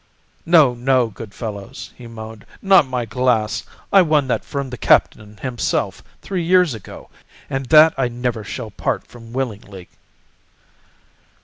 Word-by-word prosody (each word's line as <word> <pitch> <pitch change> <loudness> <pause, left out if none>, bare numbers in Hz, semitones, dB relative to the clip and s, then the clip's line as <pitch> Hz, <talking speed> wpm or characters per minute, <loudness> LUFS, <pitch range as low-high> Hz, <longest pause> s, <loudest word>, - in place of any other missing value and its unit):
"No, 155 -7 +6
no, 125 0 +1
good 110 0 -10
fellows," 110 +3 -8
he 120 - -12
moaned, 110 -1 -10 0.2
"not 190 -7 +5
my 125 -2 -2
glass. 115 -1 0 0.3
I 195 - +8
won 155 -5 +2
that - - 0
from 140 -2 -5
the 125 - -6
Captain 105 0 +2
himself 125 -1 -2 0.2
three 185 -3 -3
years 180 -3 +3
ago, 110 -4 -11 0.4
and 135 -1 -3
that 155 +2 +7
I 130 - +2
never 120 -2 -3
shall 110 +1 -6
part - - -2
from 115 -1 -14
willingly." 105 -7 -5
125 Hz, 140 wpm, -20 LUFS, 110-140 Hz, 0.4 s, I